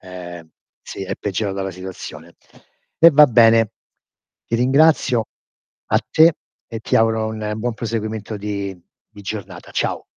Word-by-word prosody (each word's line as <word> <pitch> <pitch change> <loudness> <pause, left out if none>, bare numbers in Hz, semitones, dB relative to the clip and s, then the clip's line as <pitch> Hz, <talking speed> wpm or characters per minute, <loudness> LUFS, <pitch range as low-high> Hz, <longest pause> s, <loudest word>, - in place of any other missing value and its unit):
ehm, 90 -3 -10 0.3
sì, - - -8
è - - -4
peggiorata 100 -1 -3
la 95 - -3
situazione. 85 -3 -9 0.6
E 165 +1 +8
va 150 0 +7
bene, 115 -2 +4 0.7
ti 115 - -3
ringrazio, 130 -2 +3 0.7
a - - +4
te, 160 +1 +6 0.4
e 115 -1 -6
ti - - 0
auguro 110 -1 +2
un 110 -1 -4
buon 120 +1 -2
proseguimento 110 -1 -4
di 100 -2 -5 0.4
di 100 - -11
giornata. 95 -3 -7
Ciao. - - -2
110 Hz, 135 wpm, -20 LUFS, 95-115 Hz, 0.7 s, E